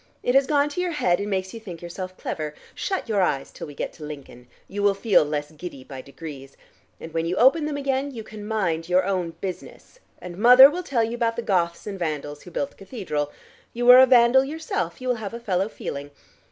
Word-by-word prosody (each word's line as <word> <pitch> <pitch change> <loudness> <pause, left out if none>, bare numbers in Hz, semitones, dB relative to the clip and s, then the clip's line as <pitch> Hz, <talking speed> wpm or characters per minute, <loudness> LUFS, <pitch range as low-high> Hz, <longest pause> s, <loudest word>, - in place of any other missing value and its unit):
It 245 - +1
has 270 0 +4
gone 290 -1 +3
to 325 +5 -3
your 360 -2 -1
head, 180 - +1
and 205 +1 -3
makes 190 -1 -2
you 230 - -7
think 185 -7 -9
yourself 185 +2 -7
clever. 150 -1 -5 0.2
Shut 385 -8 -3
your 210 -3 +1
eyes 140 -7 0
till - - -8
we 145 - -11
get - - -4
to 155 - -12
Lincoln. 140 -5 -10 0.2
You 205 +1 -5
will 200 -1 +3
feel 200 -4 +4
less 150 0 -3
giddy 155 -4 -9
by 130 -1 -9
degrees. 140 0 -10 0.4
And 160 - -9
when 165 0 -1
you 175 - -1
open 270 - +4
them 295 -1 -3
again, 275 0 -1
you 235 -5 -7
can 215 -1 -10
mind 175 -7 -1
your 180 +1 +3
own 180 -4 -2
business, 190 - -8 0.2
and 180 0 -9
mother 250 +5 +9
will 355 +3 -3
tell 260 -9 0
you 225 +1 -2
about 230 -1 0
the 235 - -4
Goths 170 -4 0
and 200 -2 -6
Vandals 150 -3 -4
who - - -12
built 280 +10 -3
the - - -25
cathedral. 185 - -4 0.4
You 240 +1 -2
are 250 - +10
a 260 - +8
Vandal 250 +1 +6
yourself: 270 - -4
you 255 - -5
will 250 -1 +1
have 210 +2 -5
a - - -6
fellow 195 -3 -1
feeling. 140 -8 -6
195 Hz, 235 wpm, -24 LUFS, 165-245 Hz, 0.4 s, are